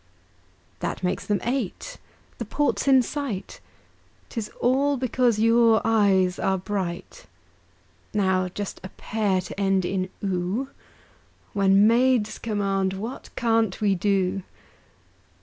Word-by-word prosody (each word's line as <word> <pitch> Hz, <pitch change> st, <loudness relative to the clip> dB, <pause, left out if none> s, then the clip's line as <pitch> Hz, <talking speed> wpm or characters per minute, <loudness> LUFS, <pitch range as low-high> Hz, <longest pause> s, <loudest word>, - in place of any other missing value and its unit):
That -, -, -4 dB
makes 180 Hz, +1 st, -2 dB
them 205 Hz, -2 st, +1 dB
eight. 255 Hz, -, -3 dB, 0.4 s
The 235 Hz, -, -3 dB
port's 290 Hz, +6 st, 0 dB
in 265 Hz, -2 st, +6 dB
sight 260 Hz, -7 st, -5 dB, 0.7 s
'Tis 225 Hz, -4 st, -4 dB
all 275 Hz, +3 st, +2 dB
because 250 Hz, -2 st, +1 dB
your 230 Hz, 0 st, +4 dB
eyes 195 Hz, -5 st, +3 dB
are 190 Hz, 0 st, +1 dB
bright! 185 Hz, -2 st, -5 dB, 0.8 s
Now 190 Hz, -3 st, +1 dB
just 195 Hz, +2 st, -6 dB
a 185 Hz, -, -7 dB
pair 200 Hz, -2 st, -1 dB
to 185 Hz, -, -8 dB
end 195 Hz, -2 st, +2 dB
in 185 Hz, 0 st, -2 dB
"oo" 195 Hz, +7 st, -1 dB, 0.8 s
When 195 Hz, 0 st, +4 dB
maids 235 Hz, -1 st, +3 dB
command, 195 Hz, -3 st, -1 dB
what 220 Hz, +7 st, -6 dB
can't 225 Hz, -4 st, +1 dB
we 205 Hz, -2 st, +2 dB
do? 195 Hz, 0 st, 0 dB
205 Hz, 115 wpm, -24 LUFS, 190-235 Hz, 0.8 s, in